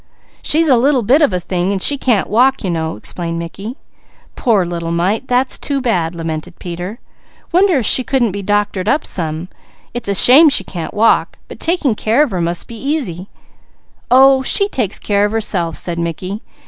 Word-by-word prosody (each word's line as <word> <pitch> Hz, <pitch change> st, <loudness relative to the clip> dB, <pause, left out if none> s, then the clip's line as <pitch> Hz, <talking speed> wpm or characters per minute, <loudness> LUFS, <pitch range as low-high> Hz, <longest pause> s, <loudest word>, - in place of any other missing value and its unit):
"She's 320 Hz, +2 st, +2 dB
a 260 Hz, -4 st, +4 dB
little 260 Hz, 0 st, +2 dB
bit 265 Hz, +9 st, +3 dB
of 295 Hz, -, +3 dB
a 180 Hz, -, -1 dB
thing 180 Hz, +1 st, -2 dB
and 200 Hz, -, -1 dB
she 285 Hz, -, +3 dB
can't 245 Hz, -7 st, 0 dB
walk, 255 Hz, +5 st, +2 dB
you 185 Hz, -, -2 dB
know," 160 Hz, -1 st, -3 dB
explained 170 Hz, -1 st, -5 dB
Mickey. 195 Hz, -, -7 dB, 0.6 s
"Poor 215 Hz, -7 st, +1 dB
little 170 Hz, -1 st, -5 dB
mite! 190 Hz, +9 st, -1 dB
That's 250 Hz, +1 st, +1 dB
too 280 Hz, -1 st, -2 dB
bad," 180 Hz, -10 st, -1 dB
lamented 165 Hz, +1 st, -6 dB
Peter. 180 Hz, +5 st, -7 dB, 0.5 s
"Wonder 360 Hz, -1 st, +3 dB
if 245 Hz, -, -1 dB
she 255 Hz, -, +4 dB
couldn't 245 Hz, -4 st, 0 dB
be 200 Hz, +1 st, -5 dB
doctored 205 Hz, -1 st, -1 dB
up. 290 Hz, +2 st, +1 dB, 0.9 s
It's 240 Hz, -3 st, -5 dB
a 200 Hz, -, 0 dB
shame 285 Hz, -, +7 dB
she 285 Hz, -, 0 dB
can't 170 Hz, -3 st, -7 dB
walk, 225 Hz, +2 st, +2 dB
but -, -, -11 dB
taking 330 Hz, -7 st, 0 dB
care 225 Hz, +6 st, +1 dB
of 285 Hz, -, -3 dB
her 180 Hz, -2 st, -2 dB
must 170 Hz, +1 st, -1 dB
be 230 Hz, -, -9 dB
easy!" 245 Hz, -, -3 dB, 0.8 s
"Oh 265 Hz, +2 st, +5 dB
she 400 Hz, +9 st, +4 dB
takes 235 Hz, -, -2 dB
care 205 Hz, -1 st, 0 dB
of 205 Hz, +1 st, 0 dB
herself," 180 Hz, -7 st, -2 dB
said 170 Hz, -1 st, -4 dB
Mickey. 180 Hz, +5 st, -4 dB
210 Hz, 185 wpm, -16 LUFS, 175-265 Hz, 0.9 s, shame